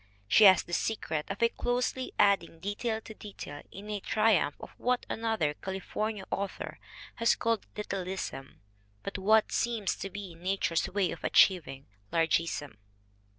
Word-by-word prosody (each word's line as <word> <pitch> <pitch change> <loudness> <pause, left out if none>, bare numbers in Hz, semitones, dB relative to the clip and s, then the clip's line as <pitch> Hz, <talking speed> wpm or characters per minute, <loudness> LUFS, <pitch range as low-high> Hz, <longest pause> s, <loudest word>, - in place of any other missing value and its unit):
She 210 - +7
has 190 -1 +8
the 175 - -10
secret 165 -6 -1
of 200 +3 -2
closely 250 +1 -1
adding 185 -5 +3
detail 220 +4 -2
to 220 - -10
detail 195 -9 -9
in 200 +2 -9
a 205 - -2
triumph 205 -9 +2
of - - -9
what 250 0 +1
another 220 -10 0
California 195 +4 -4
author 200 0 -4 0.4
has 230 0 +4
called 230 -1 -1
Littleism, 190 -8 -5 0.4
but - - -4
what 215 +3 +4
seems 230 -4 0
to 195 - -5
be 195 -2 -7
nature's 175 -1 0
way 195 -3 +1
of - - -8
achieving 145 -8 +3 0.3
Largeism." 165 -6 0
195 Hz, 140 wpm, -30 LUFS, 170-220 Hz, 0.4 s, has